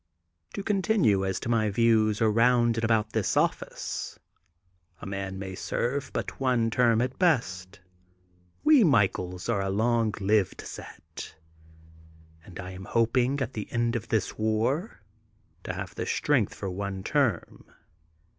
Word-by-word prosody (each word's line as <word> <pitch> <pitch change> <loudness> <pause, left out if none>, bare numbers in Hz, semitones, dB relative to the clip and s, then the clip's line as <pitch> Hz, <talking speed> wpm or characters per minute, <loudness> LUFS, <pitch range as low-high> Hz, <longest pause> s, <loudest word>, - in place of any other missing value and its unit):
To 200 - -4
continue 195 - +2
as 95 0 -1
to - - -5
my 110 -2 +2
views 110 0 +2
around 115 +1 +3
and 115 - 0
iabout 110 -1 +2
this 110 -3 0
office. - - -2 0.8
A - - -9
man 95 -1 -4
may 95 -1 -6
serve 125 +8 -2
but - - -4
one 125 -4 +1
term 115 -1 +3
at 125 +1 -4
best. 100 - 0 0.8
We 300 -5 +6
Michaels 95 - +1
are 100 - +1
a 95 - -2
long 110 +2 +1
lived 100 -1 +1
set, - - -10 1.1
and 90 0 -12
I 90 0 -6
am 95 +1 -9
hoping 125 +4 +1
at 125 - -2
the 105 - -6
end 120 0 0
of 115 -1 -3
this 110 -3 -1
war 110 - -1 0.6
to - - -3
have - - -6
strength - - +1
for - - -5
one 95 0 -4
term. - - -1
110 Hz, 140 wpm, -27 LUFS, 100-120 Hz, 1.1 s, We